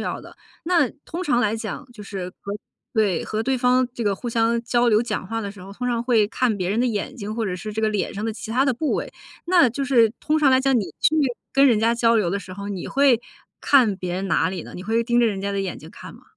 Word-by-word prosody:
要 -, -, -3 dB
的。 -, -, -14 dB, 0.3 s
那 330 Hz, -6 st, +2 dB
通 345 Hz, +3 st, -5 dB
常 295 Hz, -8 st, +2 dB
来 215 Hz, -2 st, +1 dB
讲， 220 Hz, +2 st, -6 dB
就 210 Hz, -3 st, -11 dB
是， 195 Hz, -3 st, -5 dB
和 200 Hz, -, -5 dB, 0.4 s
对， 210 Hz, -7 st, +1 dB
和 215 Hz, -, -3 dB
对 260 Hz, +4 st, 0 dB
方 250 Hz, 0 st, +3 dB
这 235 Hz, -, -4 dB
个 205 Hz, -2 st, +1 dB
互 240 Hz, -, -5 dB
相 230 Hz, 0 st, +1 dB
交 240 Hz, +1 st, +2 dB
流 215 Hz, -1 st, +4 dB
讲 225 Hz, -5 st, -3 dB
话 225 Hz, +4 st, -3 dB
的 200 Hz, -2 st, -5 dB
时 200 Hz, -3 st, -13 dB
候， 195 Hz, +2 st, -10 dB
通 250 Hz, +5 st, -4 dB
常 235 Hz, -1 st, 0 dB
会 235 Hz, -4 st, +3 dB
看 230 Hz, 0 st, 0 dB
别 180 Hz, -1 st, -1 dB
人 210 Hz, +4 st, 0 dB
的 -, -, +2 dB
眼 235 Hz, +3 st, -2 dB
睛， 210 Hz, -4 st, -6 dB
或 225 Hz, 0 st, -2 dB
者 185 Hz, -, -2 dB
是 215 Hz, +4 st, -6 dB
这 220 Hz, -, -2 dB
个 220 Hz, -, +2 dB
脸 210 Hz, -2 st, -2 dB
上 210 Hz, +1 st, -5 dB
的 225 Hz, -, -1 dB
其 220 Hz, +1 st, -8 dB
他 255 Hz, +4 st, +2 dB
的 270 Hz, -3 st, +1 dB
部 295 Hz, +5 st, -1 dB
位。 -, -, -3 dB, 0.3 s
那 345 Hz, -8 st, +4 dB
就 275 Hz, +4 st, -3 dB
是 235 Hz, -5 st, +4 dB
通 305 Hz, -, 0 dB
常 290 Hz, -3 st, +4 dB
来 260 Hz, 0 st, +4 dB
讲， 270 Hz, -1 st, +2 dB
你 -, -, 0 dB, 0.2 s
去 315 Hz, -, +3 dB, 0.4 s
跟 275 Hz, 0 st, +5 dB
人 235 Hz, -5 st, +4 dB
家 230 Hz, +2 st, +2 dB
交 230 Hz, -1 st, +3 dB
流 210 Hz, -6 st, +1 dB
的 200 Hz, +3 st, -2 dB
时 185 Hz, -1 st, -10 dB
候， 200 Hz, +2 st, -7 dB
你 195 Hz, -3 st, -5 dB
会 275 Hz, -4 st, +3 dB, 0.4 s
看 250 Hz, -8 st, +4 dB
别 180 Hz, -2 st, -4 dB
人 190 Hz, +2 st, -3 dB
哪 185 Hz, -, +1 dB
里 185 Hz, -3 st, -5 dB
呢？ -, -, -11 dB
你 180 Hz, -, -7 dB
会 225 Hz, +4 st, +1 dB
盯 240 Hz, 0 st, +2 dB
着 235 Hz, -, +4 dB
人 200 Hz, -3 st, -2 dB
家 200 Hz, +1 st, -2 dB
的 200 Hz, -, -1 dB
眼 190 Hz, -2 st, -4 dB
睛 -, -, -12 dB
看 -, -, -11 dB
吗？ -, -, -17 dB
225 Hz, 305 characters per minute, -23 LUFS, 200-250 Hz, 0.4 s, 跟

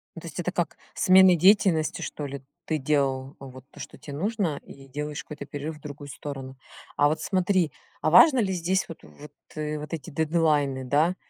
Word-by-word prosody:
Ну -, -, -8 dB
то -, -, -9 dB
есть -, -, -8 dB
это -, -, -1 dB
как -, -, -2 dB, 0.2 s
смены 185 Hz, -1 st, +6 dB
деятельности, 185 Hz, -3 st, +3 dB
что 145 Hz, -, -5 dB
ли, 140 Hz, -1 st, -6 dB, 0.2 s
ты 155 Hz, -, 0 dB
делал 135 Hz, -1 st, 0 dB
вот 130 Hz, -1 st, -11 dB
то, -, -, -15 dB
что -, -, -9 dB
те 145 Hz, -, -10 dB
нужно, 190 Hz, -2 st, -1 dB
и 135 Hz, 0 st, -14 dB
делаешь 150 Hz, +2 st, -5 dB
какой-то 145 Hz, -2 st, -8 dB
перерыв 145 Hz, +2 st, -6 dB
в -, -, -21 dB
другую 145 Hz, -1 st, -9 dB
сторону. 135 Hz, -2 st, -7 dB, 0.4 s
А, 145 Hz, -, +5 dB
вот 155 Hz, +1 st, -1 dB
смотри, 185 Hz, -1 st, +1 dB, 0.3 s
а 155 Hz, -, +2 dB
важно 260 Hz, -, +8 dB
ли 190 Hz, -4 st, +1 dB
здесь 185 Hz, +2 st, 0 dB
вот 165 Hz, -, -9 dB
вот 75 Hz, -, -13 dB, 0.2 s
и 150 Hz, 0 st, -3 dB
вот 150 Hz, +3 st, -7 dB
эти 165 Hz, +1 st, -5 dB
дедлайны, 150 Hz, -4 st, +1 dB
да? 155 Hz, +7 st, +2 dB
150 Hz, 195 wpm, -26 LUFS, 140-175 Hz, 0.4 s, важно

